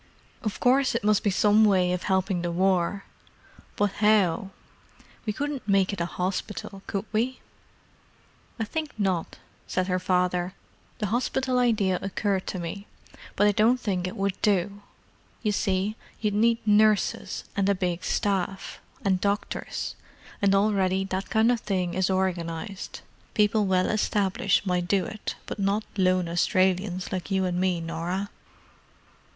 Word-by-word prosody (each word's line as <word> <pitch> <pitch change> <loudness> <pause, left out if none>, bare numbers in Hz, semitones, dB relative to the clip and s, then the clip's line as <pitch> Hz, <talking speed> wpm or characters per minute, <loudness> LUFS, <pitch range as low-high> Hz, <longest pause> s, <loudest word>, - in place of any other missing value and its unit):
Of 215 -4 -3
course 260 0 +3
it 235 - -1
must 210 -1 +3
be 205 - +2
some 210 +2 +4
way 185 -4 +4
of 180 - -2
helping 190 -2 0
the 175 0 -2
War. 185 +2 +1 0.7
But 205 -1 +1
how? 200 -2 +3 0.8
We - - +2
couldn't 285 -2 -4
make 195 -1 +3
it 190 - -3
a 170 - 0
hospital, 195 +3 -4
could 200 +1 -2
we?" 240 +4 0 1.2
"I - - +1
think 310 +6 -4
not," 190 -5 -1 0.3
said 185 - 0
her 185 -1 0
father. 180 0 0 0.4
"The 210 - -2
hospital 255 +1 +1
idea 210 -7 +2
occurred 195 0 -1
to - - -3
me, 180 +4 -6 0.5
but 205 - +3
I 210 - +5
don't 225 +5 +3
think 185 -6 -1
it 185 - -6
would 195 0 0
do. 200 0 +1 0.6
You 210 - +2
see 195 +1 0 0.2
you'd 210 -2 0
need 230 +2 +3
nurses 210 0 +2
and 200 0 +1
a 200 - +3
big 180 -1 -2
staff, 195 -1 -1 0.2
and 190 -2 +2
doctors; 200 0 -2 0.5
and 200 -1 +4
already 195 -2 +2
that 190 +1 -3
kind 220 +2 +4
of 240 - +1
thing 185 -5 -1
is 185 0 +1
organized. 185 0 -2 0.3
People 210 -1 +3
well 185 -1 +3
established 200 -2 +1
might 180 -2 0
do 190 -1 +2
it, 215 +4 -5
but - - -6
not 200 +2 +1
lone 185 -2 +2
Australians 185 +2 +1
like 185 0 -3
you 190 -1 +1
and 180 0 -1
me, 185 -2 +1
Norah." 170 +4 -3
195 Hz, 150 wpm, -26 LUFS, 185-210 Hz, 1.2 s, I